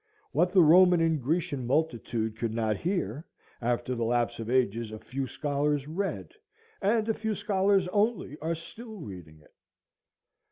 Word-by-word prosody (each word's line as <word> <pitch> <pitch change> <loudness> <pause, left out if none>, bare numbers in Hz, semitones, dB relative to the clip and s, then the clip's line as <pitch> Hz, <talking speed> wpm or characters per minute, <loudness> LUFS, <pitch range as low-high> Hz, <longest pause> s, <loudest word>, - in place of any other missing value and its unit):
What 175 +3 +2
the 185 -2 +6
Roman 180 +2 +7
and 165 -3 +2
Grecian 145 -2 -1
multitude 120 -6 -1
could 115 0 -3
not 110 -2 +1
hear, 155 - -2 0.4
after 120 +1 -1
the 120 -2 -2
lapse 120 0 0
of 115 0 -5
ages 115 -3 +1
a 110 - -6
few 135 +4 -4
scholars 145 +2 -1
read, 190 +5 -3 0.5
and 215 +2 +2
a 225 - +2
few 220 0 -2
scholars 195 -2 +2
only 210 - 0
are 165 +2 -1
still 220 +7 -10
reading 90 - -10
it. - - -24
145 Hz, 155 wpm, -28 LUFS, 120-180 Hz, 0.5 s, Roman